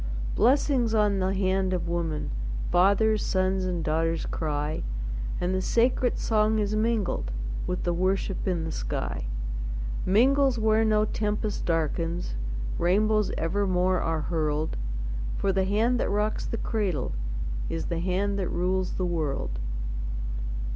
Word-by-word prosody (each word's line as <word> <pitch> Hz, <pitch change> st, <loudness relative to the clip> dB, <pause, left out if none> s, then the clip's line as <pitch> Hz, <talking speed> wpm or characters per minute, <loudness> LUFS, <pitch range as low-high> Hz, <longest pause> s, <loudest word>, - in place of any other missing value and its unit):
Blessings 250 Hz, -1 st, +3 dB
on 205 Hz, -2 st, +3 dB
the 185 Hz, 0 st, +1 dB
hand 190 Hz, -1 st, +1 dB
of 180 Hz, -2 st, -1 dB
women! 165 Hz, -, -2 dB, 0.4 s
Fathers, 200 Hz, +4 st, +4 dB
sons, 185 Hz, 0 st, +1 dB
and 175 Hz, -3 st, -1 dB
daughters 165 Hz, +1 st, 0 dB
cry, 150 Hz, -1 st, -2 dB, 0.6 s
And 180 Hz, +1 st, 0 dB
the 185 Hz, -, +1 dB
sacred 245 Hz, +4 st, +2 dB
song 215 Hz, 0 st, +2 dB
is 210 Hz, 0 st, 0 dB
mingled 215 Hz, -, 0 dB, 0.4 s
With 180 Hz, -, -2 dB
the 175 Hz, -, +1 dB
worship 190 Hz, +2 st, 0 dB
in 175 Hz, -3 st, 0 dB
the 160 Hz, -, -3 dB
sky -, -, -3 dB, 0.8 s
Mingles 265 Hz, +6 st, +4 dB
where 220 Hz, 0 st, +3 dB
no 215 Hz, -1 st, +3 dB
tempest 210 Hz, 0 st, -1 dB
darkens, 165 Hz, -, 0 dB, 0.5 s
Rainbows 210 Hz, +4 st, +3 dB
evermore 185 Hz, +1 st, +1 dB
are 160 Hz, -1 st, 0 dB
hurled; 155 Hz, -1 st, -1 dB, 0.6 s
For 195 Hz, -, +1 dB
the 190 Hz, 0 st, +2 dB
hand 225 Hz, +5 st, +2 dB
that -, -, 0 dB
rocks 210 Hz, +1 st, 0 dB
the 230 Hz, -, -2 dB
cradle 195 Hz, -, -1 dB, 0.6 s
Is 80 Hz, -1 st, -2 dB
the 170 Hz, -, -2 dB
hand 195 Hz, +3 st, 0 dB
that 185 Hz, -, -1 dB
rules 185 Hz, +1 st, 0 dB
the 185 Hz, -, -1 dB
world. 145 Hz, -, -2 dB
190 Hz, 135 wpm, -27 LUFS, 170-215 Hz, 0.8 s, Fathers